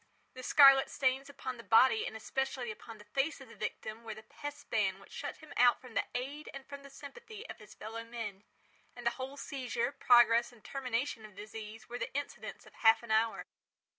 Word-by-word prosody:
The 255 - -8
scarlet 275 +1 +7
stains 265 +1 +1
upon 260 -3 -5
the 230 - -10
body 225 0 +5
and - - -6
especially 255 +1 -2
upon 220 +1 -10
the 210 - -13
face 270 +8 0
of - - -12
the - - -12
victim, 220 +2 -5
were 220 -2 -6
the 215 - -11
pest 290 +5 -8
ban 195 -4 +1
which 195 - -17
shut - - -5
him 310 -2 -12
out 245 0 +6
from 255 -3 -13
the - - +1
aid 280 +5 -4
and 275 -1 -8
from 280 0 -9
the 280 - -12
sympathy 440 - -10
of - - -8
his 215 0 -14
fellow 225 +2 -6
men. 225 -4 -6 0.5
And 245 -1 -9
the 235 - +4
whole 270 +2 -5
seizure, 250 -3 -2
progress 240 -3 +5
and 235 -3 -19
termination 255 -3 -2
of 210 -2 -12
the 205 - -7
disease, 220 0 -9
were 245 +1 -5
the - - -3
incidents 285 0 -5
of - - -16
half 225 +1 +5
an 235 - -6
hour. 220 +1 +2
245 Hz, 215 wpm, -33 LUFS, 220-275 Hz, 0.5 s, scarlet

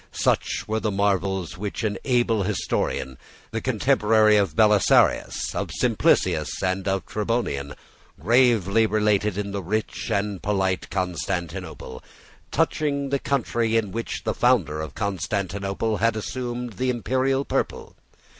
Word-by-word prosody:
Such - - 0
were 110 +1 0
the 110 - -1
marvels 95 -3 -1
which 105 +3 -4
an 105 -3 -1
able 120 -4 +2
historian, 65 -7 -2 0.3
the - - -3
contemporary 110 0 +3
of 100 -7 +1
Belisarius, 105 -1 +3
of - - -3
Simplicius, - - +1
and 95 +2 -1
of 95 -3 0
Tribonian, 105 -11 -2 0.4
gravely 115 -3 +3
related 105 -2 +1
in 100 -1 -3
the 100 0 -3
rich 105 +5 -3
and 100 -2 -1
polite 95 -2 -1
Constantinople, 90 -7 -4 0.5
touching 140 -2 0
the 140 0 0
country 115 -5 0
in 105 -4 -1
which 115 +3 -4
the 110 -2 -1
founder 95 - +2
of 80 -3 -7
Constantinople 100 +2 -2
had 115 +1 +2
assumed 120 +1 -4
the 130 0 0
imperial 130 +3 0
purple. - - -3
105 Hz, 125 wpm, -24 LUFS, 95-115 Hz, 0.5 s, contemporary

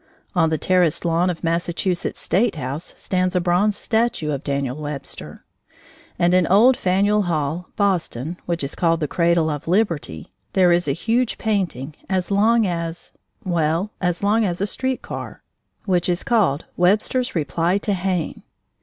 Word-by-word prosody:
On 165 -3 +3
the 160 - 0
terraced 180 0 +2
lawn 170 +2 +2
of 170 -2 -4
Massachusetts' 170 +2 -1
State 215 +2 +1
house 140 +3 -5
stands 185 0 -1
a - - +4
bronze 180 +4 +2
statue 225 -9 0
of 140 -1 -3
Daniel 140 -3 -2
Webster. 145 -2 -7 0.7
And 175 +1 +3
in 185 -2 +4
old 230 +7 +6
Faneuil 200 +2 +2
Hall, 160 +1 -1
Boston 175 - -1
(which 170 -3 -1
is 140 - -3
called 165 -1 +1
the 150 - -1
Cradle 170 0 +2
of 150 +1 -5
Liberty), 165 - -1 0.2
there 185 -2 +4
is 175 -1 +2
a - - +2
huge 235 - 0
painting, 170 - -2
as 185 0 -1
long 220 +3 +4
as 170 -2 -4 0.3
well 170 +1 0
as 180 0 -1
long 215 +3 +3
as 180 -4 -1
a 200 - +1
street 260 +5 -2
car, - - -7 0.4
which 180 -3 +1
is 175 0 0
called 195 -11 +1
"Webster's 215 +7 +1
Reply 170 +3 +1
to 205 0 -1
Hayne." 180 -3 -2
175 Hz, 160 wpm, -21 LUFS, 165-200 Hz, 0.7 s, old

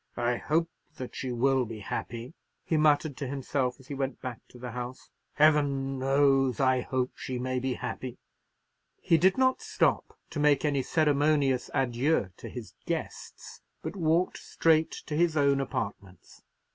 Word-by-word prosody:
"I 120 0 +1
hope 165 +6 0 0.2
that 125 - -7
she 130 - -3
will 130 +2 +2
be 110 -2 -7
happy," 120 +6 -5 0.3
he 165 - 0
muttered 150 -1 +3
to 140 - -4
himself 135 -1 -2
as 130 - -16
he - - -5
went 135 0 -3
back 125 -4 -6
to - - -15
the 125 -1 -6
house. 125 +2 -7 0.2
"Heaven 140 -3 +3
knows 135 -2 +3
I 130 -1 +3
hope 130 0 -1
she 130 - -5
may 130 +1 -1
be 130 0 -1
happy." 125 -2 -5 0.8
He 165 - +3
did 190 +6 +4
not 260 0 +3
stop - - 0
to 150 - -4
make 150 0 +3
any 140 -2 +2
ceremonious 145 -3 +2
adieu 130 - +1
to - - -8
his 115 -7 -8
guests, - - -5 0.2
but - - -4
walked 170 0 +1
straight 160 -1 +2
to 150 - -4
his 165 0 +2
own 140 -1 +3
apartments. 100 -7 -6
135 Hz, 160 wpm, -29 LUFS, 125-150 Hz, 0.8 s, did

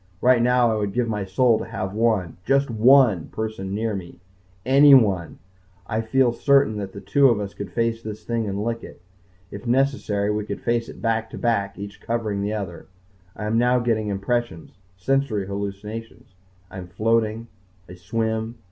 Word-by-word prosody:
Right 125 +1 +4
now 125 -1 +3
I 110 - 0
would 100 -2 -2
give 120 -1 0
my 105 -3 -2
soul 115 +4 +2
to - - -5
have 100 -4 -5
one 110 -6 0
just 140 +1 +1
one 115 - +4
person 110 -3 -5
near 110 +1 -1
me. 90 -3 -8 0.5
Anyone. 130 - +5 0.5
I 110 +3 -2
feel 120 +2 +2
certain 140 -4 +3
that 100 -1 -7
two 135 +7 +4
of 115 -3 +1
us 100 -1 -5
could 100 -3 -7
face 115 +3 -1
this 110 -1 -8
thing 115 -2 -2
and 100 +1 -3
lick 115 0 -3
it. - - -11 0.5
If 100 +4 -8
necessary 120 -6 +1
we 105 0 -1
could 105 - -5
face 120 -1 -1
it - - -12
back 115 -1 0
to - - -8
back, 100 -4 -1
each 100 0 -9
covering 110 -4 -2
the 100 +1 -2
other. 95 -5 -6 0.5
I 105 - -6
am 110 +2 +1
now 125 +1 +3
getting 115 -3 0
impressions. 100 -2 -2 0.3
Sensory 115 -1 0
hallucinations. 100 +2 -7 0.4
I 95 - -7
am 90 - -8
floating. 110 +3 0 0.4
I 90 - -10
swim. 110 +5 -3
110 Hz, 175 wpm, -23 LUFS, 100-120 Hz, 0.5 s, Anyone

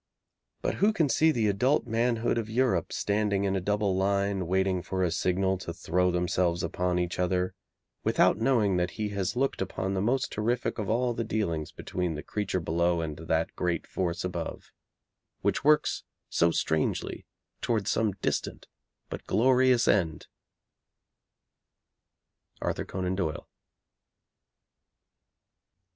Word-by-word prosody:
But - - +1
who 210 +2 +5
can 160 -9 +2
see 160 +4 +4
the 115 -7 +1
adult 125 +8 +2
manhood 115 0 +1
of 110 -1 -4
Europe 115 -7 +1
standing 100 -1 0
in 100 -1 +1
a 95 - 0
double 105 0 +1
line, 100 -1 0
waiting 95 0 +1
for 95 +1 -2
a 85 - +1
signal 95 +2 +1
to 85 - -6
throw 90 +2 +1
themselves 90 -1 0
upon 90 0 -1
each 90 0 -2
other, 90 0 0 0.5
without - - +3
knowing 110 -6 +2
that 90 0 +1
he 105 -1 -1
has 100 +2 -2
looked 135 -3 0
upon 95 0 -2
the 95 - 0
most 125 +5 0
terrific 120 +3 -1
of 105 - -3
all 120 +2 +1
the 115 - -2
dealings 90 -9 -2
between 90 -3 -3
the 75 - -6
creature 105 -3 -2
below 85 +1 +1
and 80 -2 -3
that 80 0 -1
great 85 -2 -1
force 85 -2 -2
above, 90 -2 -5 0.7
which - - 0
works 150 +1 +3 0.3
so 85 - +3
strangely 80 -1 -1 0.3
towards 110 -5 0
some 110 -3 +1
distant - - -2 0.4
but - - -8
glorious 130 0 +4
end? 85 -6 +1 2.3
ARTHUR - - -2
CONAN 90 0 -2
DOYLE. 80 -5 -3
95 Hz, 140 wpm, -28 LUFS, 90-115 Hz, 2.3 s, who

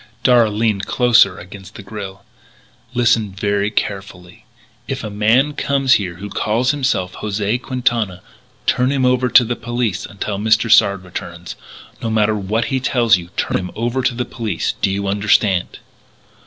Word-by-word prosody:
Darragh 120 -3 +5
leaned 105 -2 0
closer 120 -6 +4
against 95 +1 -12
the - - -9
grille: 100 -1 -8 0.7
"Listen 115 -4 +2
very 100 +1 0
carefully; 95 -4 -5 0.4
if - - -4
a 105 - -5
man 115 +8 +2
comes 140 -2 +1
here 90 -4 0
who 100 +4 -8
calls 120 +4 +1
himself 130 -11 -1
José 105 +3 -2
Quintana, 120 -8 -1 0.4
turn 125 +1 +2
him 135 -2 +1
over 125 0 +2
to 125 - +7
the 120 +1 -2
police 115 -5 -3
until 100 0 -5
Mr. 110 +1 +2
Sard 100 -3 +4
returns. 90 -1 -8 0.5
No 115 - -2
matter 110 -1 +2
what 105 +3 -1
he 130 - +2
tells 120 -4 +3
you, 85 -1 -9
turn - - 0
him 90 -1 -5
over 120 +3 -1
to 125 -1 0
the 125 0 -2
police. 110 -9 -3
Do - - +2
you 100 +1 -2
understand?" 100 -2 +1
110 Hz, 160 wpm, -18 LUFS, 100-120 Hz, 0.7 s, to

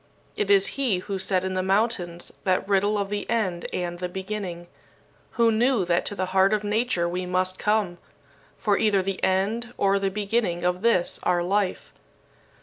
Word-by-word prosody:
It 200 - -1
is 195 -1 +6 0.2
he 235 -9 +2
who 190 +1 -4
said 185 -1 +1
in 190 0 -2
the 185 - 0
mountains 190 -3 0
that 185 0 +1
riddle 205 +1 +2
of 200 0 -2
the 205 0 -3
end 190 -7 -1
and 175 -1 -3
the 180 0 -3
beginning 190 -2 -5 0.7
who 230 -1 +3
knew 230 -2 +2
that 175 0 +1
to 205 - -4
the 185 - -1
heart 195 +2 +4
of 210 - -3
nature 210 -4 0
we 180 +1 -3
must 185 +1 -1
come, 210 -5 0 0.6
for 205 -2 +1
either 200 -3 +2
the 195 0 -4
end 215 +6 0
or 200 0 +2
the 195 0 0
beginning 200 -3 -1
of 180 +1 0
this, 225 -6 +1
our 175 -1 +1
life. 195 +1 -1
195 Hz, 180 wpm, -25 LUFS, 180-210 Hz, 0.7 s, is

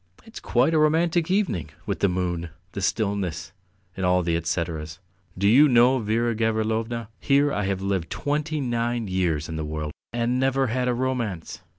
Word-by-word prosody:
It's 225 - -10
quite 125 +7 +2
a 160 - +4
romantic 165 +2 +2
evening, 185 - 0 0.2
with - - -2
the 100 - +3
moon, 90 -2 -2 0.2
the 100 - -5
stillness, 100 -5 -1 0.4
and 95 - -4
all 90 0 +3
the 85 0 0
etceteras. 85 -2 -3 0.4
Do 100 +2 +2
you 135 +8 +7
know, 125 +2 +5
Vera 115 +2 0
Gavrilovna, 110 +1 -1
here 140 +1 +3
I 105 - -1
have 95 -1 -2
lived 95 -4 -1
twenty 150 +2 -2
nine 120 -2 -1
years 85 -5 0
in 80 -1 -5
the 80 - -3
world 75 0 -4 0.2
and 120 +1 0
never 135 0 +2
had 125 0 0
a 125 - +1
romance. 120 -9 -3
110 Hz, 175 wpm, -25 LUFS, 90-130 Hz, 0.4 s, you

